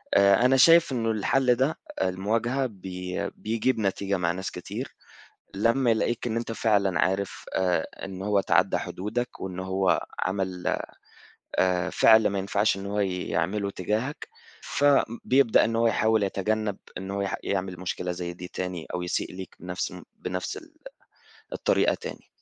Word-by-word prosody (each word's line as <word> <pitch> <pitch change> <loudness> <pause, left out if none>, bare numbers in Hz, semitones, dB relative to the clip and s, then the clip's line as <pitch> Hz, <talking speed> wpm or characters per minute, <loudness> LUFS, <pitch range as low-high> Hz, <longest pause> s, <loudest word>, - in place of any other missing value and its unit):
آآ 100 +4 +5
أنا 135 +1 +5
شايف 165 +3 +7
إنه 115 -3 0
الحل 125 +4 +2
ده 135 +6 +1 0.2
المواجهة 110 +8 0
بي 90 -4 -5
بيجيب 115 +3 -1
نتيجة 100 -1 0
مع 85 -1 +1
ناس 95 +2 -4
كتير، - - -6 0.6
لمّا 115 +4 +3
يلاقيك 115 +2 0
إن 115 -1 -1
أنت 115 -1 -3
فعلًا 100 -6 +2
عارف 95 +3 0
آآ 90 -2 +1 0.2
إن 95 -1 -7
هو 100 0 +2
تعدّى - - +3
حدودك 115 +6 -4
وإن 95 -1 -5
هو 95 0 +1 0.2
عمل 95 -1 -1 0.8
آآ 90 -1 +2
فعل 110 -1 +6
ما 100 -1 -1
ينفعش 100 +1 +1
إن 95 - -6
هو 100 +1 -2
يعمله 95 +1 -1
تجاهك، 110 - -3 0.3
فبيبدأ 135 -3 +3
إن 115 - -1
هو 115 0 +3
يحاول 110 -1 +2
يتجنّب 105 +1 -1 0.2
إنه 95 +2 -5
هو 100 - -1
يح 100 - -1
يعمل 95 -2 -2
مشكلة 90 0 -3
زي 90 0 -4
دي 90 +1 -8
تاني 90 -3 -5
أو 90 - -2
يسيء 90 - -2
ليك 95 -1 -8
بنفس 90 0 -4 0.3
بنفس 90 0 -4
ال 320 -1 -13 0.8
الطريقة - - +2
تاني. - - -8
100 Hz, 150 wpm, -26 LUFS, 95-115 Hz, 0.8 s, شايف